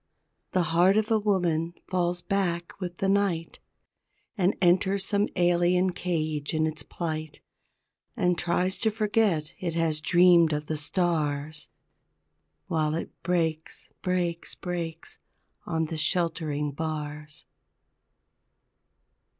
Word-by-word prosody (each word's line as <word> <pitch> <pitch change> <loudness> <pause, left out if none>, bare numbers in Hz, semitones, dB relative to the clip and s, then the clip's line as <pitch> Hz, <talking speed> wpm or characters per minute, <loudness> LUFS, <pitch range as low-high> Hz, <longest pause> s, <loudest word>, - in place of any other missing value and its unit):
The 185 - +3
heart 180 +4 +5
of 215 +1 +1
a 220 - +4
woman 175 -5 0
falls 175 -1 0
back 175 -2 -1
with 175 -1 -5
the 195 - 0
night, 195 -4 0 0.8
And 190 -2 +2
enters 190 +2 +3
some 205 0 +1
alien 175 +1 +3
cage 155 -4 -2
in 155 0 +2
its 155 -1 -3
plight, 155 -1 -5 0.8
And 180 0 +2
tries 175 +2 0
to 220 - +2
forget 210 -7 +1
it 170 -3 -3
has 160 -2 +1
dreamed 175 -1 +5
of 150 0 -2
the 155 - -2
stars 150 -2 -1 1.0
While 155 -1 0
it 165 - -4
breaks, 165 -3 -2
breaks, 175 -2 -1
breaks 170 -2 -5 0.5
on 160 -1 0
the 160 +1 -5
sheltering 155 -3 0
bars. 150 0 -5
170 Hz, 115 wpm, -27 LUFS, 155-180 Hz, 1.0 s, heart